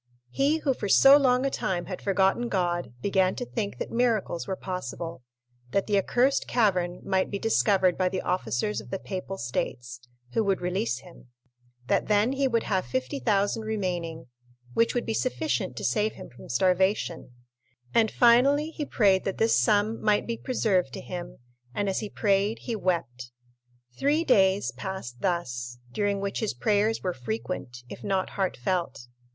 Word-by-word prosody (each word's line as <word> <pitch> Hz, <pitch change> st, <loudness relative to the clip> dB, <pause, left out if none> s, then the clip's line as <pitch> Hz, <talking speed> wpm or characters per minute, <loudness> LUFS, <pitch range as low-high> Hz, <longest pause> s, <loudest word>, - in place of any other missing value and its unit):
He, 285 Hz, +3 st, +2 dB
who 285 Hz, -4 st, 0 dB
for 205 Hz, -, -4 dB
so 270 Hz, +7 st, +8 dB
long 260 Hz, -2 st, +3 dB
a 275 Hz, -, 0 dB
time 180 Hz, -7 st, -2 dB
had 185 Hz, -, -6 dB
forgotten 195 Hz, +4 st, +1 dB
God, 175 Hz, -4 st, -1 dB
began 190 Hz, -2 st, +2 dB
to 245 Hz, -, -4 dB
think 215 Hz, -4 st, -4 dB
that -, -, -5 dB
miracles 230 Hz, -8 st, 0 dB
were 190 Hz, -, -2 dB
possible—that 125 Hz, -5 st, -6 dB
the 205 Hz, -, 0 dB
accursed 245 Hz, +7 st, +2 dB
cavern 180 Hz, -7 st, +1 dB
might 190 Hz, -1 st, 0 dB
be 200 Hz, -, -3 dB
discovered 195 Hz, -4 st, +2 dB
by 185 Hz, -1 st, +2 dB
the 185 Hz, -, -3 dB
officers 180 Hz, -, -1 dB
of -, -, -14 dB
the 195 Hz, -, -2 dB
Papal 190 Hz, 0 st, -6 dB
States, 120 Hz, -1 st, -4 dB, 0.3 s
who 225 Hz, -, +2 dB
would 195 Hz, -2 st, +1 dB
release 155 Hz, -10 st, -1 dB
him; 170 Hz, -6 st, -16 dB, 0.6 s
that -, -, +1 dB
then 210 Hz, +3 st, +3 dB
he 275 Hz, 0 st, +1 dB
would 230 Hz, -3 st, +1 dB
have 190 Hz, -, -1 dB
50,000 140 Hz, -, 0 dB
remaining, 180 Hz, -7 st, -3 dB, 0.5 s
which 230 Hz, -, +2 dB
would 245 Hz, -, 0 dB
be -, -, -1 dB
sufficient 255 Hz, +7 st, -1 dB
to -, -, -5 dB
save 215 Hz, -1 st, +1 dB
him -, -, -11 dB
from 120 Hz, -, -14 dB
starvation; 180 Hz, -, +1 dB, 0.6 s
and 225 Hz, -1 st, +4 dB
finally 275 Hz, +8 st, +4 dB
he 310 Hz, -, -4 dB
prayed 195 Hz, -7 st, +3 dB
that 195 Hz, -, -2 dB
this 225 Hz, 0 st, +3 dB
sum 215 Hz, +1 st, +2 dB
might 210 Hz, -1 st, +2 dB
be 235 Hz, -, -2 dB
preserved 200 Hz, -, 0 dB
to -, -, -6 dB
him, 175 Hz, +6 st, -7 dB, 0.4 s
and 205 Hz, -, 0 dB
as 195 Hz, -, 0 dB
he 210 Hz, -, -5 dB
prayed 200 Hz, +1 st, +1 dB
he 235 Hz, -, -3 dB
wept. 130 Hz, -, -2 dB, 0.7 s
Three 295 Hz, +4 st, +2 dB
days 195 Hz, -8 st, +3 dB
passed 190 Hz, -11 st, -7 dB
thus, 125 Hz, -10 st, -2 dB
during 205 Hz, +5 st, 0 dB
which 200 Hz, 0 st, -2 dB
his 220 Hz, -, -2 dB
prayers 210 Hz, -, +1 dB
were 180 Hz, -1 st, -1 dB
frequent, 120 Hz, 0 st, -5 dB
if -, -, -10 dB
not 195 Hz, -2 st, -1 dB
heartfelt. 175 Hz, -6 st, -2 dB
195 Hz, 165 wpm, -27 LUFS, 175-220 Hz, 0.7 s, so